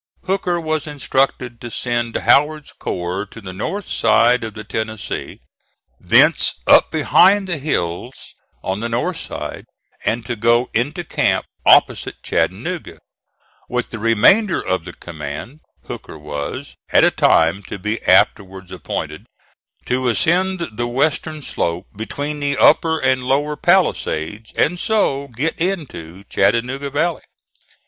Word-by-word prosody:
Hooker 185 -2 0
was 155 -2 -2
instructed 135 -4 -1
to 120 - -6
send 120 0 -2
Howard's 150 +1 +2
corps 90 +3 -4
to 115 - -12
the 95 -4 -8
north 195 - -4
side 120 +1 +3
of 110 -1 -6
the 110 - -7
Tennessee, 110 -1 -5 0.6
thence - - +4
up - - +6
behind 200 0 +4
the 170 -4 -2
hills 120 - -3 0.3
on 95 +1 -2
the 115 +2 -3
north 115 +1 -1
side, - - -6 0.4
and 115 +1 -1
to 120 - -3
go 115 +3 +2
into 145 +9 -1
camp - - 0 0.2
opposite - - +4
Chattanooga; - - -2 0.7
with 125 -1 -2
the 115 - -5
remainder 115 - +4
of 95 -2 -2
the 85 - -8
command, 80 - -8 0.3
Hooker - - -8
was, 75 -2 -6 0.2
at - - +5
a - - +5
time 85 +4 +3
to - - -5
be 105 +4 -3
afterwards 95 -1 +2
appointed, 90 - -5 0.6
to 125 0 0
ascend 175 +7 +1
the 120 +3 -2
western 150 +4 -1
slope 85 -7 -2
between 145 +7 -4
the 140 -1 -1
upper 160 +1 +4
and 130 -3 +1
lower 145 +4 0
palisades, 110 - 0
and 175 +3 +1
so 175 - +1
get 140 +7 -3
into 130 - -4
Chattanooga 130 +4 0
valley. 160 +4 -1
125 Hz, 135 wpm, -19 LUFS, 105-155 Hz, 0.7 s, up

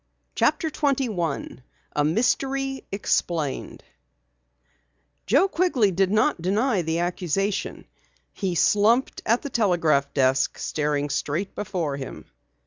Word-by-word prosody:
CHAPTER 320 -2 +1
21 225 - -1 0.3
A 145 - +2
MYSTERY 270 - 0
EXPLAINED 170 -7 -2 1.4
Joe 280 - +4
Quigley 325 - +2
did 190 +1 +1
not 215 - +2
deny 205 +4 +1
the 160 0 -1
accusation. 180 +3 -2 0.5
He 190 -4 -2
slumped 215 +9 +3
at 230 +2 +2
the 285 - -5
telegraph 165 - +2
desk, 130 0 +2
staring 145 -1 -1
straight 170 +7 -2
before 170 -8 -3
him. 135 - -8
195 Hz, 105 wpm, -24 LUFS, 160-240 Hz, 1.4 s, Joe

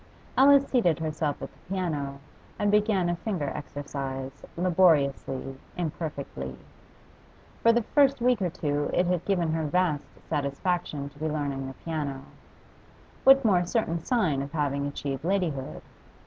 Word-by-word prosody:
Alice 275 +2 +7
seated 180 - +2
herself 155 -2 -2
at - - -7
the - - -24
piano, 150 -8 -2 0.4
and 205 0 +1
began 210 -3 +3
a 175 - +1
finger 175 -8 -2
exercise, 140 -2 -5
laboriously, 145 -7 +2 0.2
imperfectly. 145 - -4 1.1
For 230 - +6
the 235 0 +2
first 280 +2 +3
week 245 -3 +2
or 180 - +1
two 145 -4 -1
it 180 - +3
had 180 -1 0
given 175 -5 +1
her 160 -1 0
vast 160 -2 +1 0.2
satisfaction 145 0 -1
to 145 +1 -19
be 155 - -1
learning 140 -3 -2
the 135 - -8
piano; 145 -5 -3 1.0
what 270 -1 +7
more 185 -5 +4
certain 175 -3 0
sign 175 - +1
of 140 +2 -6
having 140 -2 0
achieved 140 -1 -4
ladyhood? 170 -7 -1
160 Hz, 140 wpm, -27 LUFS, 140-185 Hz, 1.1 s, Alice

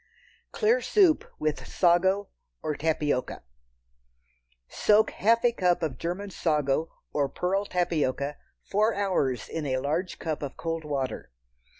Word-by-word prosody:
Clear 460 +3 +2
Soup 370 -7 +4
with 155 -1 -2
Sago 190 +3 +2 0.3
or 155 - -1
Tapioca. 150 -4 -1 1.2
Soak 215 +1 +3
half 230 +3 +2
a 240 - +5
cup 180 -6 +1
of 135 -6 -3
German 190 +4 -4
sago 150 -2 0 0.2
or 140 -2 +1
pearl 190 +7 -1
tapioca 150 -6 -1 0.3
four 215 +2 +1
hours 160 - 0
in 155 -3 -4
a 130 -1 0
large 155 +7 -2
cup 155 -2 -3
of 140 -2 -6
cold 165 -1 -3
water. 135 - -3
165 Hz, 125 wpm, -27 LUFS, 145-200 Hz, 1.2 s, a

